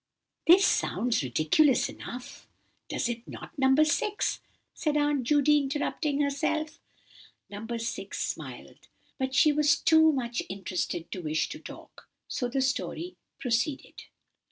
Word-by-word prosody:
"This 370 +4 +8
sounds 245 - +1
ridiculous 155 - +3
enough, 245 +1 -9 0.4
does - - -1
it 240 -1 -5
not, - - -9
dear 265 0 +4
No. 275 +4 +6
6?" 400 +7 0 0.3
said 300 -2 -1
Aunt 290 -2 +2
Judy, 295 +3 +4
interrupting 290 +1 -1
herself. 305 +2 -1 0.7
No. 205 +2 -7
6 230 +1 -5
smiled, - - -6 0.3
but 265 0 -2
she 305 - +6
was 295 0 +3
too 320 -1 +5
much 240 -4 -2
interested 180 -3 -4
to 185 - -5
wish 155 -1 -1
to - - -7
talk; - - -13 0.2
so 245 - -2
the 265 +2 -1
story 275 +6 -2 0.2
proceeded. 245 +3 -2
270 Hz, 130 wpm, -28 LUFS, 235-300 Hz, 0.7 s, This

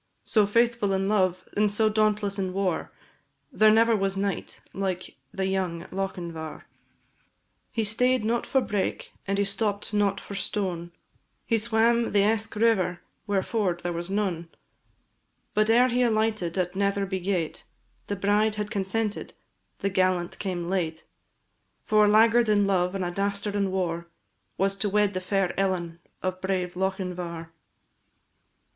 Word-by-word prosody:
So 215 -3 +3
faithful 230 -2 +2
in 190 0 0
love, 185 -3 +1
and 210 0 +2
so 215 +1 +2
dauntless 210 -2 +1
in 185 -1 -2
war, 190 -3 -1 0.6
There 215 0 +5
never 225 +1 +5
was 195 -1 0
knight 200 -1 -3
like 190 -2 -3 0.2
the 190 - -2
young 185 -3 -1
Lochinvar. 175 -5 -5 1.1
He 225 -2 -1
stay'd 250 +2 +2
not 235 +1 0
for 265 - +2
brake, 205 -5 -2
and 195 0 0
he 200 - +2
stopp'd 205 +1 -2
not 205 -1 +2
for - - -9
stone, 185 -4 -3 0.5
He 230 -2 +2
swam 235 +1 +2
the 200 -1 +4
Eske 220 +1 0
river 210 -5 +2 0.3
where 200 -2 +1
ford 185 -6 -1
there 175 0 -2
was 170 +2 -4
none; 190 -5 -1 1.0
But 215 +1 +2
ere 245 +3 +5
he 250 +1 +1
alighted 215 -6 +1
at 180 0 -1
Netherby 200 -1 0
gate, 180 -4 -2 0.4
The 205 - -2
bride 205 +2 +2
had 210 0 -4
consented, 205 +2 -2 0.5
the 200 - 0
gallant 185 -2 +1
came 180 -3 -3
late: 165 -4 -2 0.8
For 215 0 +4
a - - +4
laggard 225 +2 +5
in 205 -1 +4
love, 185 -1 +1
and 190 -2 -1
a 175 - -2
dastard 200 +2 -2
in 200 -1 +1
war, 170 -3 -2 0.5
Was 195 +1 +1
to 205 +1 -1
wed 205 0 +2
the 185 - -2
fair 195 -1 0
Ellen 175 -4 -1 0.2
of 185 0 -2
brave 185 -2 -1
Lochinvar. 180 -3 -3
195 Hz, 150 wpm, -26 LUFS, 185-215 Hz, 1.1 s, There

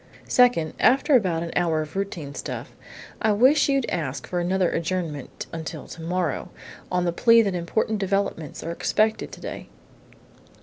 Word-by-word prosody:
"Second, 245 -11 +3
after 270 +4 +4
about 180 -8 +2
an 170 - -5
hour 165 -3 +1
of 155 +3 -12
routine 175 -8 -4
stuff, - - -6 0.5
I 220 -2 +3
wish 265 +8 +4
you'd 275 -3 +1
ask 140 -6 -3
for 180 - -2
another 180 0 +1
adjournment 165 -5 -3
until 160 -1 -6
tomorrow, 170 -1 -3 0.4
on 180 0 +1
the 170 - 0
plea 230 +4 +6
that 200 -3 -1
important 200 +5 -1
developments 195 -6 -2
are 165 - -3
expected 215 +5 0
today." - - -8
180 Hz, 145 wpm, -24 LUFS, 165-215 Hz, 0.5 s, plea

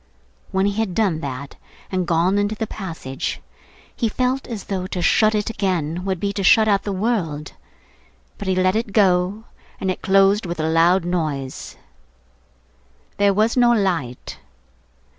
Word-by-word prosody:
When 190 +1 +1
he 205 +1 -1
had 205 -6 -1
done 195 -8 +1
that, 140 -2 -6 0.3
and 185 -2 -1
gone 175 +4 +2
into 205 +1 0
the 220 - -3
passage, 165 -11 -5 0.6
he 230 - 0
felt 255 +4 -1
as 225 -5 -5
though 185 -2 -3
to 185 - -4
shut 215 +4 +3
it 210 +1 -1
again 180 -5 -2
would 190 -2 -1
be 200 +2 -2
to 200 - -3
shut 215 +5 +6
out 200 -2 +3
the 205 - -4
world. 185 - -2 0.9
But 200 - -5
he 190 - +1
let 185 +1 +2
it 220 -2 -2
go, 190 +1 +2 0.4
and 190 - 0
it - - -6
closed 195 +1 +3
with 170 -1 -5
a 155 - 0
loud 170 +3 +3
noise. 155 -7 -3 1.4
There 200 0 +4
was 215 +4 +1
no 240 -1 +5
light. 170 - -2
190 Hz, 160 wpm, -21 LUFS, 170-210 Hz, 1.4 s, shut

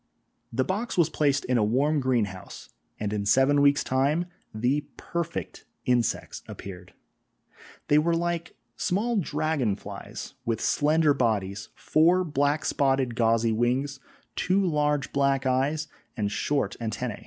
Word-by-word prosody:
The 130 +3 +1
box 205 - -3
was 165 -2 +3
placed 145 -2 +1
in 125 -1 +2
a - - +3
warm 140 +8 +2
greenhouse, 115 -8 -2 0.3
and 105 -1 -2
in 105 -1 -1
seven 135 +7 +4
weeks' 140 0 +4
time 140 +6 +1 0.3
the 125 +7 0
perfect 170 -1 -4 0.2
insects 120 -2 0
appeared. 90 -2 -9 0.9
They 150 - +5
were 165 +2 +2
like 170 0 -2 0.2
small 220 +6 0
dragon 150 - 0
flies, - - -8
with 115 -3 -1
slender 150 +3 +3
bodies, 100 -6 -1
four 170 +4 +3
black 145 -1 0
spotted 135 -3 +1
gauzy 115 0 +2
wings, 130 +5 0 0.4
two 195 +1 +1
large 150 -4 0
black 140 -1 +2
eyes 135 +4 +1 0.3
and 100 -2 -1
short 120 -1 -1
antennæ. 115 0 -3
140 Hz, 130 wpm, -26 LUFS, 115-155 Hz, 0.9 s, They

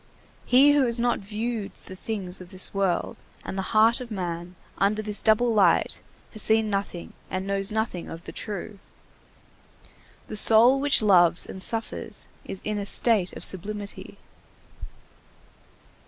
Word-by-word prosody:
He 270 +4 +5
who 280 -3 +2
has 235 0 0
not 240 0 0
viewed 215 +1 -5
the 185 - -10
things 190 -3 -5
of 180 - -12
this 185 0 -1
world 195 -3 -1 0.3
and - - -6
the 195 - -2
heart 225 +2 +3
of 245 - -8
man 180 -3 -6 0.2
under 210 +2 0
this 210 -1 -2
double 230 +2 +2
light 205 -3 +2 0.3
has 215 - -4
seen 220 0 +2
nothing 195 -3 -5 0.2
and 185 0 -4
knows 195 +1 -1
nothing 220 -5 -3
of 165 +1 -9
the - - -9
true. 205 0 -6 1.5
The - - -7
soul 230 +5 +7
which 285 -4 +2
loves 175 -4 +4
and 190 - -9
suffers 225 +3 -1 0.2
is 190 - -6
in 210 -1 -3
a 200 - -4
state 205 -4 +1
of - - +2
sublimity. 200 +2 -2
210 Hz, 150 wpm, -24 LUFS, 190-225 Hz, 1.5 s, soul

